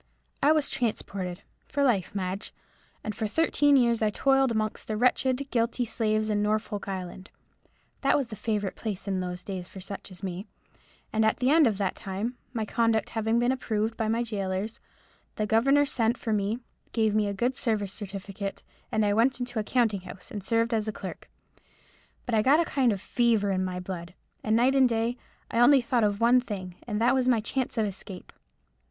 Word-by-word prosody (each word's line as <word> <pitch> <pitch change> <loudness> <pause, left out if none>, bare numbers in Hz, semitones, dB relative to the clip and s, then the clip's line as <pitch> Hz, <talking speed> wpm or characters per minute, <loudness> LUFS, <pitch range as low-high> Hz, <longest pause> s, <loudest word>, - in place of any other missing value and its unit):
I 290 - +5
was 305 -2 +3
transported, 195 -6 -3 0.2
for 285 - 0
life, 210 -8 +1
Madge; 190 +1 -4 0.5
and 215 - -3
for 220 +1 -2
thirteen 290 +2 +3
years 235 -3 +3
I 215 - +3
toiled 270 +4 +3
amongst 215 -1 -2
the 215 - -2
wretched, 255 +3 +2
guilty 235 +1 +1
slaves 215 -1 0
in 210 -1 +1
Norfolk 210 -1 -1
Island—that 190 +8 -4
was 265 -5 -2
the - - -4
favourite 210 -2 -2
place 210 -3 -5
in 190 -1 0
those 180 0 -4
days 185 -3 -5
for 190 - -10
such 195 +2 -8
as 185 +1 -14
me—and 195 +3 -6
at 220 - +3
the 255 +2 +2
end 310 -3 +6
of 215 -4 0
that 195 -2 -1
time, 210 +4 -4 0.2
my 225 -3 -2
conduct 225 -1 +1
having 225 0 +1
been 240 +1 +3
approved 220 -4 -1
of - - -29
by 220 - 0
my 230 +2 +1
gaolers, 200 -1 -3 0.6
the 215 - -1
governor 275 +7 +4
sent 235 -4 +1
for 220 - -2
me, 205 +2 0 0.4
gave 220 -2 +2
me 215 -1 +2
a - - -1
good 245 +5 0
service 210 -7 -1
certificate, 195 -1 -6 0.3
and 220 -1 +2
I 205 - +2
went 240 +5 +3
into 245 -2 -3
a - - 0
counting 220 -4 +1
house 185 0 -11
and 205 -3 -5
served 230 +3 +1
as 220 -1 0
a - - 0
clerk. 195 -2 -8 1.0
But 245 - -3
I 220 - +4
got 275 +7 +5
a 340 - +3
kind 265 -6 +2
of 200 - -2
fever 225 -2 +2
in 185 -1 0
my 180 -1 -3
blood, 180 -1 -6 0.3
and 215 0 +2
night 245 +3 +4
and 265 -2 +5
day 230 +1 0 0.3
I 230 - +1
only 270 +3 +7
thought 235 -1 +1
of 205 -1 +1
one 240 +2 +5
thing, 190 -6 -6
and 210 -2 -1
that 240 +3 +4
was 260 -1 +1
my 245 -3 +4
chance 245 +3 -2
of 220 - +2
escape. 195 -1 -8
220 Hz, 200 wpm, -27 LUFS, 200-245 Hz, 1.0 s, only